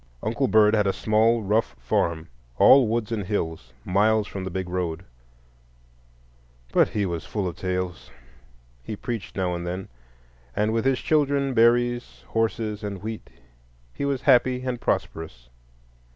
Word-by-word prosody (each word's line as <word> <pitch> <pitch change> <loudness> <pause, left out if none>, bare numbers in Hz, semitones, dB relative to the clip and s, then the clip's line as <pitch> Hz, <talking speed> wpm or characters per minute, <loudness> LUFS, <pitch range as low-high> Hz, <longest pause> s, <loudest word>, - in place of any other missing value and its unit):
Uncle 115 +5 0
Bird 110 -2 +5
had 105 -2 +2
a 95 - +2
small, 110 +1 +2
rough 105 - 0
farm, 80 +7 -1 0.3
all 135 -3 +7
woods 115 0 -1
and 110 -3 -1
hills, 80 - -3
miles 105 +3 +2
from 95 -2 -6
the 95 - -4
big 95 0 -4
road; 90 -1 -3 1.7
but - - +5
he 105 -1 -1
was 85 -4 -3
full 95 +4 -3
of 85 - -5
tales,—he 60 - -7
preached 115 -1 -5
now 90 -2 -1
and 85 0 -4
then,—and 60 - -6
with 115 +2 0
his 135 -1 +3
children, 140 -3 +1
berries, 120 - +2
horses, 110 -1 -1
and 100 -2 -5
wheat 110 0 -6 0.6
he - - -5
was 140 -2 -1
happy 125 -1 +4
and 125 -2 -3
prosperous. 80 -10 -3
100 Hz, 140 wpm, -25 LUFS, 85-115 Hz, 1.7 s, all